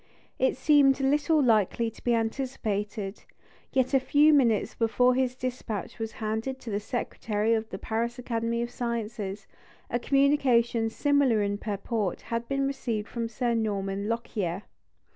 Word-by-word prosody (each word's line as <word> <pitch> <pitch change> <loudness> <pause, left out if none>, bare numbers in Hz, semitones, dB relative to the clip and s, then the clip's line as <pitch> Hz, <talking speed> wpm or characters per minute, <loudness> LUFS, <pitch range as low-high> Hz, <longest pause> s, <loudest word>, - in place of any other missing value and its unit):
It 260 0 +2
seemed 275 -1 +5
little 295 +3 +2
likely 225 0 +2
to - - -17
be 240 -1 +2
anticipated; 220 -4 -3 0.5
yet 260 -1 +1
a 270 - +6
few 290 +4 +4
minutes 235 -7 +3
before 245 +2 +3
his 255 0 0
despatch 245 -5 -5
was 225 0 -4
handed 220 +3 -3
to 230 - -6
the 205 - 0
Secretary 220 -1 -1
of 220 0 -1
the 190 - -5
Paris 230 +4 -2
Academy 235 -1 -1
of 240 - -5
Sciences, 220 -5 -4 0.5
a 240 - +1
communication 250 -5 +3
similar 275 -4 +2
in 205 0 -1
purport 205 -2 -2
had 230 0 -2
been 275 0 0
received 235 -6 -2
from 230 -1 -3
Sir 235 +1 -1
Norman 200 -2 -1
Lockyer. 210 -5 -2
230 Hz, 145 wpm, -27 LUFS, 215-260 Hz, 0.5 s, a